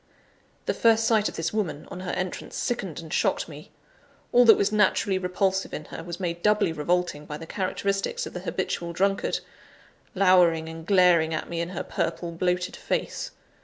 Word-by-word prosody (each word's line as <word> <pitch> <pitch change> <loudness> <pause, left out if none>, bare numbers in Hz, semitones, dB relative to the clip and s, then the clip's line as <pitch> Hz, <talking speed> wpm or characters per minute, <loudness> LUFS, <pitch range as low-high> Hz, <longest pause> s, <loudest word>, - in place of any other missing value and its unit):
The - - +1
first 225 -1 +4
sight 220 -2 +3
of - - -10
this 165 +3 -2
woman, 175 -9 -2
on 185 - -6
her 185 -1 -5
entrance, 185 0 -4
sickened 195 -9 -2
and 160 -2 -8
shocked - - +1
me. - - -11 0.6
All 245 0 +6
that 225 - +8
was 200 - +1
naturally 205 -2 +2
repulsive 190 +1 0
in 150 - -6
her, - - -6
was 170 +1 -6
made 170 -2 -3
doubly 210 -4 +3
revolting 165 -1 -1
by 150 - -5
the 165 - -9
characteristics 195 - -2
of - - -8
the - - -4
habitual 170 0 -3
drunkard, 195 +3 0 0.7
lowering 180 -4 +4
and 165 0 -8
glaring 175 -4 +4
at - - -4
me 170 -1 -2
in 170 - -3
her 180 - -4
purple, 170 -1 -2
bloated 180 +1 -1
face. - - -3
180 Hz, 180 wpm, -26 LUFS, 165-195 Hz, 0.7 s, that